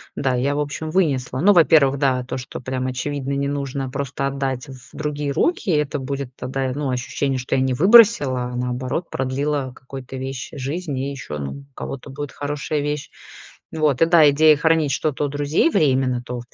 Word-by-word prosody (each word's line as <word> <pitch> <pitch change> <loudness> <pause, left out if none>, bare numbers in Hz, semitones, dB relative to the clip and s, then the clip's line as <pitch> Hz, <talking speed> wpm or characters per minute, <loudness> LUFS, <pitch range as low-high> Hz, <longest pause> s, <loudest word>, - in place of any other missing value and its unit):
Да, 130 -2 0
я, 140 +3 0
в - - -1
общем, 150 +2 -3
вынесла 135 -8 0
ну, 205 +7 +5
во-первых, 155 -5 +5
да, 130 -3 +1
то, 130 - -5
что 125 - -7
прямо 130 0 -3
очевидно 140 +2 -3
не 140 0 -1
нужно, 140 -1 -3
просто 135 +1 -3
отдать 135 -2 -3
в 130 -2 -13
другие 150 -2 -3
руки. 340 - 0
Это 150 -2 0
будет 135 -1 -5
тогда, 130 0 -3
ну, 145 -1 -2
ощущение, 130 +2 -2
что 125 - -2
я 130 - +2
не 130 -1 +1
выбросила, 185 - +6
а - - -5
наоборот, 125 +6 -3
продлила 135 0 -2
какую-то 130 0 -9
вещь 130 -1 -5
жизнь 145 +2 -4
и 135 +2 -2
еще, 125 - -6
ну, 70 -1 -4
у - - -17
кого-то 135 +1 -7
будет 145 +1 -6
хорошая 145 +1 -3
вещь. 145 0 -3 0.6
Вот, 155 -5 +1
и - - +7
да, 165 -3 +6
идея 155 +2 +6
хранить 160 -1 +2
что-то 150 +1 -1
у - - 0
друзей 145 - +1
временно, 130 - +2
то, 125 0 -5
140 Hz, 190 wpm, -21 LUFS, 130-150 Hz, 0.6 s, и